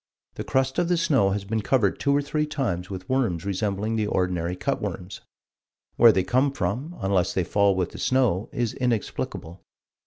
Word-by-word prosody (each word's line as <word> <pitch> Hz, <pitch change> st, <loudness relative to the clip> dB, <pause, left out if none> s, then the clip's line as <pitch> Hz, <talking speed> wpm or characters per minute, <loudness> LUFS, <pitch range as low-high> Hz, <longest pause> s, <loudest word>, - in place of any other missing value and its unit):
The -, -, -5 dB
crust 130 Hz, +2 st, 0 dB
of 175 Hz, -, +1 dB
the 175 Hz, -, +2 dB
snow 135 Hz, -11 st, +3 dB
has 100 Hz, 0 st, -2 dB
been 110 Hz, +2 st, -1 dB
covered 105 Hz, -4 st, +1 dB
two 140 Hz, -, +1 dB
or 145 Hz, -, +1 dB
three 150 Hz, +1 st, -1 dB
times 95 Hz, -, -2 dB
with 95 Hz, -1 st, -7 dB
worms 115 Hz, -11 st, 0 dB
resembling 100 Hz, +2 st, -1 dB
the 105 Hz, -1 st, 0 dB
ordinary 90 Hz, -3 st, -1 dB
cut -, -, -2 dB
worms. 90 Hz, +3 st, -5 dB, 0.7 s
Where 115 Hz, -1 st, +7 dB
they 95 Hz, -3 st, +1 dB
come 130 Hz, +7 st, +2 dB
from, 130 Hz, -, -3 dB
unless 95 Hz, -2 st, +1 dB
they 95 Hz, -, +2 dB
fall 100 Hz, +2 st, +2 dB
with 90 Hz, -2 st, -1 dB
the -, -, -9 dB
snow 120 Hz, -7 st, +1 dB
is 120 Hz, -2 st, -2 dB
inexplicable." 110 Hz, -7 st, -3 dB
105 Hz, 185 wpm, -25 LUFS, 95-130 Hz, 0.7 s, Where